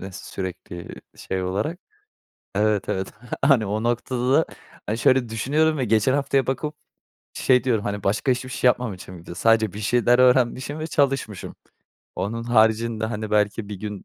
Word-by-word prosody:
eee, 95 Hz, -, -7 dB
sürekli 90 Hz, -2 st, -7 dB, 0.2 s
şey 95 Hz, -1 st, -3 dB
olarak. 105 Hz, -, -2 dB, 0.8 s
Evet, 105 Hz, -1 st, +1 dB
evet, 95 Hz, 0 st, -2 dB, 0.3 s
hani, 135 Hz, -6 st, +5 dB
o 105 Hz, +2 st, -2 dB
noktada, 125 Hz, +4 st, +1 dB, 0.4 s
hani, 110 Hz, +2 st, -1 dB
şöyle 130 Hz, 0 st, +3 dB
düşünüyorum 150 Hz, +8 st, +1 dB
ve 130 Hz, -, 0 dB
geçen 110 Hz, +4 st, +3 dB
haftaya 140 Hz, -1 st, +1 dB
bakıp 150 Hz, +3 st, -2 dB, 0.6 s
şey 125 Hz, -1 st, +3 dB
diyorum. 115 Hz, -5 st, +1 dB
Hani, 100 Hz, -1 st, -3 dB
başka 105 Hz, +7 st, +1 dB
hiçbir 125 Hz, +1 st, -2 dB
şey 125 Hz, -, +1 dB
yapmamışım 95 Hz, -7 st, -3 dB
bir 85 Hz, -, -16 dB
de; 85 Hz, -, -8 dB
sadece 110 Hz, -1 st, +3 dB
bir 105 Hz, -, -7 dB
şeyler 120 Hz, +3 st, +3 dB
öğrenmişim 130 Hz, +3 st, +3 dB
ve 155 Hz, -, -3 dB
çalışmışım. 135 Hz, -, -1 dB, 0.6 s
Onun 115 Hz, +3 st, -3 dB
haricinde, 110 Hz, -1 st, +2 dB
hani, 110 Hz, -1 st, -4 dB
belki 105 Hz, 0 st, +1 dB
bir 105 Hz, -, -5 dB
gün, 105 Hz, -2 st, -6 dB
115 Hz, 160 wpm, -23 LUFS, 105-130 Hz, 0.8 s, hani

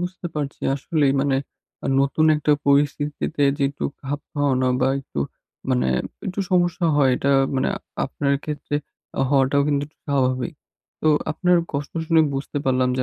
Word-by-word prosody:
বুঝতে 180 Hz, 0 st, -4 dB
পারছি। 145 Hz, -2 st, -4 dB
আসলেই, 140 Hz, 0 st, +1 dB
মানে 135 Hz, -1 st, +2 dB, 0.6 s
নতুন 140 Hz, +3 st, +2 dB
একটা 150 Hz, 0 st, +2 dB
পরিস্থিতিতে 145 Hz, +2 st, +1 dB
যে 145 Hz, -, -2 dB
একটু 140 Hz, -, -6 dB, 0.2 s
খাপ 145 Hz, +2 st, -3 dB
খাওয়ানো 130 Hz, -3 st, +1 dB
বা -, -, +3 dB
একটু 100 Hz, -, -6 dB, 0.5 s
মানে 65 Hz, +1 st, +2 dB, 0.4 s
একটু 195 Hz, +1 st, -2 dB
সমস্যা 175 Hz, -1 st, +2 dB
হয় 135 Hz, -3 st, +4 dB
এটা 140 Hz, -, 0 dB, 0.3 s
মানে 130 Hz, -, +1 dB, 0.4 s
আপনার 140 Hz, +1 st, -1 dB
ক্ষেত্রে 150 Hz, -1 st, -4 dB, 0.6 s
হওয়াটাও 140 Hz, 0 st, +3 dB
কিন্তু 140 Hz, -1 st, +1 dB
একটু 150 Hz, -, -29 dB
স্বাভাবিক। 130 Hz, +2 st, 0 dB, 0.5 s
তো 155 Hz, -, +2 dB, 0.2 s
আপনার 180 Hz, +3 st, +3 dB, 0.2 s
কষ্ট 140 Hz, 0 st, -3 dB
শুনে 165 Hz, -1 st, +5 dB
বুঝতে 140 Hz, +1 st, -3 dB
পারলাম 130 Hz, -1 st, +2 dB
যে -, -, +2 dB
145 Hz, 145 wpm, -23 LUFS, 135-155 Hz, 0.6 s, শুনে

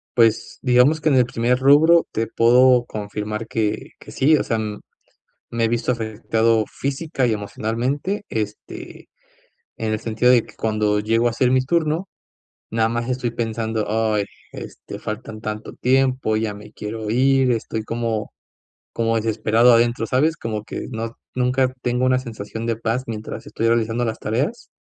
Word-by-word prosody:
Pues, 115 Hz, -2 st, +2 dB
digamos 130 Hz, +5 st, +4 dB
que 155 Hz, -, -2 dB
en 145 Hz, -, +4 dB
el 125 Hz, -1 st, +5 dB
primer 120 Hz, +1 st, +1 dB
rubro 155 Hz, +5 st, +6 dB
te 115 Hz, +1 st, -1 dB
puedo 125 Hz, +2 st, +5 dB
confirmar 105 Hz, +1 st, -5 dB
que 110 Hz, -2 st, -2 dB
que -, -, -13 dB
sí, 155 Hz, +4 st, +4 dB
o -, -, +1 dB
sea, 115 Hz, -, -1 dB, 0.9 s
me 115 Hz, -1 st, 0 dB
he 115 Hz, -, +3 dB
visto 120 Hz, +1 st, 0 dB
afectado 115 Hz, -1 st, +1 dB
física 135 Hz, -1 st, -2 dB
y 115 Hz, -, +1 dB
emocionalmente, 120 Hz, -, -2 dB
este, 105 Hz, -1 st, -6 dB, 0.7 s
en 110 Hz, -1 st, -2 dB
el 110 Hz, -, -1 dB
sentido 115 Hz, +2 st, +2 dB
de 120 Hz, -3 st, +4 dB
que -, -, -17 dB
cuando 105 Hz, -1 st, 0 dB
llego 115 Hz, +3 st, +2 dB
a -, -, -1 dB
hacer 125 Hz, +2 st, +1 dB
mi 130 Hz, -, +4 dB
turno, 165 Hz, +4 st, 0 dB, 0.6 s
nada 115 Hz, 0 st, +2 dB
más 115 Hz, +1 st, -2 dB
estoy 125 Hz, -1 st, -1 dB
pensando: 110 Hz, -2 st, -2 dB
"Ay, 110 Hz, -1 st, +1 dB, 0.3 s
este, -, -, -9 dB
faltan 110 Hz, 0 st, -6 dB
tanto 110 Hz, 0 st, -5 dB
tiempo, 130 Hz, -3 st, +1 dB
ya 110 Hz, -2 st, -2 dB
me 105 Hz, +1 st, -12 dB
quiero 110 Hz, +1 st, -6 dB
ir", 130 Hz, +1 st, +3 dB
estoy 110 Hz, -1 st, -2 dB
como 115 Hz, -2 st, -3 dB, 0.6 s
como 115 Hz, 0 st, 0 dB
desesperado 110 Hz, +2 st, +3 dB
adentro, 115 Hz, 0 st, +3 dB
¿sabes?, 150 Hz, +8 st, +2 dB
como 110 Hz, -4 st, -4 dB
que 105 Hz, -, -6 dB
no 115 Hz, -1 st, -5 dB, 0.2 s
nunca 130 Hz, +1 st, +1 dB
tengo 125 Hz, +1 st, 0 dB
una 130 Hz, 0 st, +3 dB
sensación 115 Hz, -2 st, -6 dB
de 115 Hz, -1 st, 0 dB
paz, 115 Hz, +3 st, -2 dB
mientras 110 Hz, -1 st, -6 dB
estoy 115 Hz, -, -2 dB
realizando 115 Hz, +1 st, +1 dB
las 110 Hz, -2 st, -3 dB
tareas. 140 Hz, -, -2 dB
115 Hz, 160 wpm, -21 LUFS, 110-125 Hz, 0.9 s, rubro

